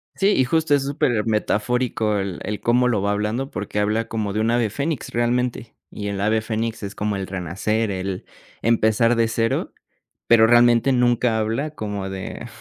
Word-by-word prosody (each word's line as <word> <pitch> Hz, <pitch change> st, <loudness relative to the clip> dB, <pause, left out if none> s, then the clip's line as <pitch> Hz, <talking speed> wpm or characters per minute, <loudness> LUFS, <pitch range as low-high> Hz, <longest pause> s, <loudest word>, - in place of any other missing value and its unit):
Sí, 195 Hz, -, +1 dB
y 130 Hz, -, +4 dB
justo, 160 Hz, +3 st, +1 dB
es 140 Hz, -, 0 dB
supermetafórico 110 Hz, -3 st, 0 dB
el 95 Hz, -2 st, -3 dB
el 105 Hz, 0 st, -4 dB
cómo 125 Hz, +1 st, +3 dB
lo 110 Hz, -5 st, +1 dB
va 100 Hz, +1 st, 0 dB
hablando 105 Hz, +6 st, -2 dB
porque 105 Hz, 0 st, -4 dB
habla 105 Hz, +2 st, 0 dB
como 110 Hz, -3 st, -3 dB
de 105 Hz, -, -1 dB
un 115 Hz, +1 st, +1 dB
ave 120 Hz, -2 st, +1 dB
Fénix, 140 Hz, +5 st, -3 dB
realmente, 120 Hz, -1 st, -1 dB, 0.2 s
y 105 Hz, -, -5 dB
el 100 Hz, -1 st, -3 dB
ave 110 Hz, +2 st, +1 dB
Fénix 110 Hz, 0 st, -3 dB
es 100 Hz, 0 st, -6 dB
como 105 Hz, 0 st, -2 dB
el 95 Hz, -1 st, -4 dB
renacer, 95 Hz, +5 st, -2 dB
el 95 Hz, 0 st, -4 dB, 0.4 s
empezar 115 Hz, +1 st, +3 dB
de 115 Hz, -1 st, +2 dB
cero, 115 Hz, 0 st, -1 dB, 0.6 s
pero 115 Hz, -1 st, +6 dB
realmente, 120 Hz, +2 st, +5 dB
nunca 120 Hz, -2 st, +2 dB
habla 115 Hz, +8 st, -1 dB
como 105 Hz, -5 st, -4 dB
de 95 Hz, +4 st, -6 dB
110 Hz, 175 wpm, -22 LUFS, 105-120 Hz, 0.6 s, pero